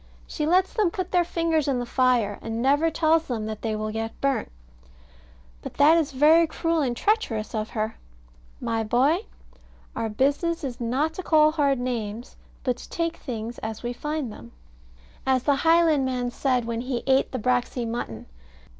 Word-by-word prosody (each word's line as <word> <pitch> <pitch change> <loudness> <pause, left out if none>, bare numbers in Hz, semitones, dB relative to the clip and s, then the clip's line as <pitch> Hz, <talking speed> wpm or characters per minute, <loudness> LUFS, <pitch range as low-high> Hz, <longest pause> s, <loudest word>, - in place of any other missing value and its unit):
She 300 - -3
lets 370 +3 +3
them 420 -5 +2
put 370 +1 -4
their 355 -1 +4
fingers 330 -3 0
in 270 -3 +1
the 245 - -2
fire, 240 -5 +1
and 225 0 -4
never 285 +6 +3
tells 320 0 +2
them 225 -4 -3
that 215 -1 -5
they 220 -2 -2
will 215 0 -3
get 225 +1 -5
burnt. 275 - -1 1.1
But - - -8
that 300 +3 +6
is 315 -3 +1
very 310 +5 +5
cruel 330 +1 0
and 245 -4 -1
treacherous 255 - 0
of 215 -1 -2
her. 215 0 -3 0.6
My 225 0 -1
boy, 275 - +2 0.7
our 225 -1 -2
business 285 +9 0
is 250 -3 -5
not 270 +7 0
to 370 - -5
call 310 -3 +4
hard 285 -3 +2
names, 235 -2 -4 0.3
but 250 -2 0
to - - -12
take 335 0 -2
things 230 -1 -6
as 220 +1 -6
we 240 0 -2
find 295 -1 -3
them, 115 - -13 0.7
as 260 -1 +2
the 285 -2 +2
Highlandman 280 -7 +2
said 250 -2 0
when 230 0 -3
he 250 -1 -3
ate 270 0 +2
the 255 - -3
braxy 245 0 0
mutton. 225 - -5
260 Hz, 175 wpm, -25 LUFS, 230-315 Hz, 1.1 s, that